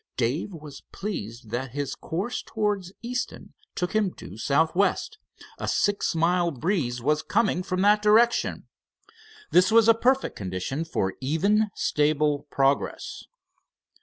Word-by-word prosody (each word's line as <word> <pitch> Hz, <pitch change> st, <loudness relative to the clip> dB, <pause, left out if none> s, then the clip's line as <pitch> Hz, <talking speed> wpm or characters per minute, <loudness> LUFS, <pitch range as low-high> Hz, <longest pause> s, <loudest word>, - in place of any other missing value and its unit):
Dave 130 Hz, -, -1 dB
was 150 Hz, -5 st, -10 dB
pleased 115 Hz, -, -6 dB
that 125 Hz, +1 st, -3 dB
his 140 Hz, -1 st, -3 dB
course 195 Hz, +9 st, -4 dB
towards 205 Hz, -4 st, -2 dB
Easton 245 Hz, +1 st, -4 dB, 0.2 s
took 180 Hz, -1 st, -2 dB
him 215 Hz, -3 st, +3 dB
due -, -, -11 dB
southwest. 160 Hz, -, +1 dB, 0.4 s
A -, -, -4 dB
six 205 Hz, -4 st, +1 dB
mile 170 Hz, +1 st, +2 dB
breeze 140 Hz, -, -2 dB
was 150 Hz, +3 st, +2 dB
coming 210 Hz, -4 st, +1 dB
from 185 Hz, 0 st, -2 dB
that 210 Hz, +1 st, +4 dB
direction. 225 Hz, +3 st, +3 dB, 0.8 s
This 180 Hz, +4 st, +5 dB
was 225 Hz, 0 st, +6 dB
a 230 Hz, -, +8 dB
perfect 260 Hz, +4 st, +1 dB
condition 95 Hz, -, -3 dB
for 95 Hz, -12 st, -1 dB
even, 200 Hz, +10 st, +2 dB
stable 150 Hz, -1 st, +1 dB
progress. 135 Hz, 0 st, -1 dB
170 Hz, 130 wpm, -26 LUFS, 140-210 Hz, 0.8 s, a